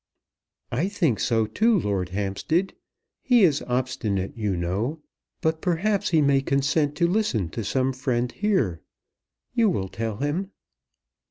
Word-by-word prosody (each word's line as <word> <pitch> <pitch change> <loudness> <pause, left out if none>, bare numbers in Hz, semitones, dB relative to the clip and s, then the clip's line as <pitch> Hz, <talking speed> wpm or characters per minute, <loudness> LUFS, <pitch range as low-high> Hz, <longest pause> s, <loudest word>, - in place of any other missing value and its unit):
"I 145 +10 0
think 170 - 0
so 115 -2 +2
too, 215 - +2
Lord 95 - -1
Hampstead. 105 - -1 0.5
He 245 -4 +4
is 150 -6 +4
obstinate, 125 -6 -1
you 105 -5 -1
know; 100 - -2 0.4
but, 160 0 0
perhaps, 195 +3 +1
he 160 -3 +3
may 140 -1 +3
consent 145 +2 +1
to 170 +3 +2
listen 170 - 0
to 115 - -5
some 130 +5 0
friend 125 -2 -1
here. 160 - 0 0.7
You 225 -2 +3
will 95 - -2
tell 110 0 -4
him." 150 +8 -2
135 Hz, 140 wpm, -25 LUFS, 110-170 Hz, 0.7 s, He